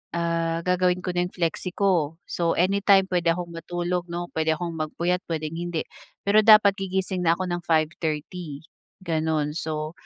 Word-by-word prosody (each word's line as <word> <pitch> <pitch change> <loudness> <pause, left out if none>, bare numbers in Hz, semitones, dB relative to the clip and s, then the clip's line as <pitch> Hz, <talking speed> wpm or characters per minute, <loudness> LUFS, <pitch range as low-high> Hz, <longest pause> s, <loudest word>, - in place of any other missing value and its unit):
ah, 165 -1 0
gagawin 180 0 +2
ko 180 - -1
na 175 0 +2
yung - - -16
flexie 175 +1 -2
ko. 170 -6 +1
So, 170 -1 0
anytime 195 +2 +4
puwede 175 -2 +2
akong 175 -1 -5
matulog, 175 +1 -3
'no, 175 0 -4
puwede 160 0 +1
akong 170 +1 -4
magpuyat, 170 +3 -1
puwedeng 160 -1 -3
hindi. 175 -2 -2 0.4
Pero 205 +2 +6
dapat 210 -2 +8
gigising 190 -1 -2
na 165 0 +4
ko 185 - -2
ng 175 0 -2
5:30, 155 0 -2 0.4
ganun. 160 -3 0
So, 155 -1 -3
175 Hz, 160 wpm, -25 LUFS, 160-180 Hz, 0.4 s, dapat